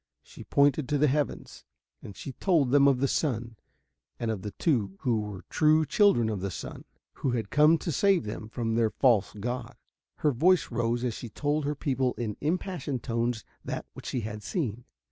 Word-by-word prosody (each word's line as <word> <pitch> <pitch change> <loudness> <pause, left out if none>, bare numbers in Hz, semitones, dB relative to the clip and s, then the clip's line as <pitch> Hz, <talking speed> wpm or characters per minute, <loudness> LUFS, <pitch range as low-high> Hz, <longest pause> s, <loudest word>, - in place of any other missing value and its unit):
She - - -12
pointed 140 0 +2
to 145 - +2
the 145 - +4
heavens, 145 0 -2 0.4
and 95 - -10
she 135 - -6
told 155 -4 +1
them 140 0 +6
of 135 -3 +3
the 140 - +3
sun 120 -6 -1 0.6
and 115 -2 -1
of 105 -4 -4
the 105 - -4
two 105 - 0
who 120 -3 +1
were 105 -3 -6
true 155 0 +3
children 200 - +4
of 105 -4 -2
the 100 - -2
sun, - - -7 0.4
who 130 - +1
had 110 -5 -3
come 150 +3 +5
to 165 - -3
save 195 +3 +3
them 105 0 -6
from 115 -1 -2
their 115 -1 +2
false 115 -5 +3
god. 120 +4 -4 0.4
Her 150 - +1
voice 175 +8 +3
rose 120 +1 0
as 125 -2 0
she 120 - -7
told 145 +6 -1
her 150 +1 -1
people 130 -4 0
in 110 -4 -3
impassioned 155 - -2
tones 115 0 -1 0.2
that - - -4
which - - -10
she 125 - -2
had 105 0 -6
seen. 120 - -3
125 Hz, 195 wpm, -28 LUFS, 110-150 Hz, 0.6 s, them